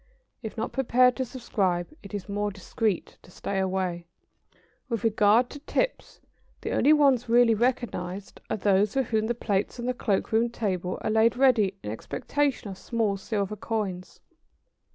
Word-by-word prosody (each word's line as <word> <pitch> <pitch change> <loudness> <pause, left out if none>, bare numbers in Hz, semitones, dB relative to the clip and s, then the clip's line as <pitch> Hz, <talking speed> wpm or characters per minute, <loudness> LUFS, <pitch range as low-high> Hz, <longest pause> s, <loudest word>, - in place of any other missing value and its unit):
If 220 0 -7
not 220 - -2
prepared 250 -1 +3
to 260 - -1
subscribe, 195 -8 -1
it 200 0 -8
is 200 - -5
more 205 0 -1
discreet 200 0 -2
to - - -18
stay 195 +2 -3
away. 185 -2 -2
[Sidenote: - - -49
On - - -40
tips.] - - -37
With 230 -1 -2
regard 220 +2 +4
to 290 - -8
tips - - -2 0.4
the - - -3
only 290 - +4
ones 275 -6 +4
really 235 0 +5
recognised 210 -5 -2
are - - -1
those 200 0 +2
for 270 - +3
which 220 -2 0
the 240 - -1
plates 210 0 -1
on 240 - -4
the 250 - 0
cloak 205 -5 -1
room 225 +2 +3
table 185 -6 -2
are - - -1
laid 225 +2 +3
ready 225 -7 +3
in 105 - -4
expectation 280 - -2
of 190 -1 -7
small 220 -1 0
silver 200 +1 -2
coins. 205 -4 -4
220 Hz, 175 wpm, -27 LUFS, 195-245 Hz, 0.4 s, really